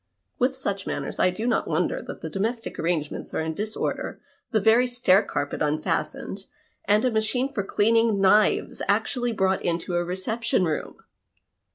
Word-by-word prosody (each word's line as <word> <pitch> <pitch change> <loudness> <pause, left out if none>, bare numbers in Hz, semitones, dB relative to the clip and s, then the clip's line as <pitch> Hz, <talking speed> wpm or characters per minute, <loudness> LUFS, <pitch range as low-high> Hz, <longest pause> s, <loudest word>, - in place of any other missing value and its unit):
With 260 +1 +2
such 200 -7 -3
manners, - - -4
I 185 - +5
do 185 +5 -4
not 245 - +1
wonder - - 0
that - - -8
the - - -5
domestic 225 +4 -3
arrangements 165 -3 -2
are - - 0
in 160 0 -2
disorder, 210 +5 -3 0.3
the 220 - +2
very 225 +5 +4
stair 245 -6 +4
carpet 145 -7 -3
unfastened, 165 +5 -2 0.4
and 210 +4 +3
a 250 - +2
machine 240 +5 0
for 200 - 0
cleaning 225 +1 +2
knives 195 +2 +3
actually 245 -2 +1
brought 190 -3 +1
into 170 +1 -2
a 175 0 +1
reception 190 +4 -1
room 155 -2 -3
205 Hz, 160 wpm, -25 LUFS, 180-230 Hz, 0.4 s, I